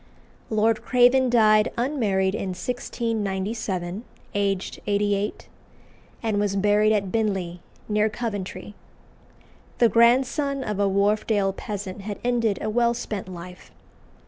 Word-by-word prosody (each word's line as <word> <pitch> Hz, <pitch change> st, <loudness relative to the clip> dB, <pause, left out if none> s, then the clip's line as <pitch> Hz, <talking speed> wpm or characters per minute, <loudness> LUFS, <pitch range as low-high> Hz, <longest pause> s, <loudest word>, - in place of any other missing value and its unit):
Lord 220 Hz, 0 st, +2 dB
Craven 250 Hz, +1 st, +4 dB
died 215 Hz, -3 st, +4 dB
unmarried 215 Hz, -8 st, +1 dB
in 190 Hz, -3 st, -3 dB
1697, 210 Hz, -4 st, -3 dB, 0.3 s
aged 195 Hz, -2 st, -1 dB
88, 205 Hz, 0 st, 0 dB, 0.8 s
and 215 Hz, -2 st, 0 dB
was 205 Hz, -1 st, 0 dB
buried 210 Hz, +2 st, +3 dB
at 200 Hz, -3 st, 0 dB
Binley, 190 Hz, -6 st, -1 dB, 0.3 s
near 210 Hz, 0 st, +2 dB
Coventry. 210 Hz, -3 st, -5 dB, 1.0 s
The 235 Hz, -, +5 dB
grandson 265 Hz, +4 st, +3 dB
of 210 Hz, -4 st, -3 dB
a 200 Hz, -1 st, +3 dB
Wharfdale 200 Hz, 0 st, +1 dB
peasant 200 Hz, -2 st, -6 dB
had 205 Hz, 0 st, -5 dB
ended 235 Hz, -5 st, +1 dB
a 215 Hz, -, -1 dB
well 235 Hz, +1 st, +2 dB
spent 210 Hz, -5 st, -5 dB
life. 180 Hz, 0 st, -10 dB
210 Hz, 115 wpm, -24 LUFS, 195-230 Hz, 1.0 s, The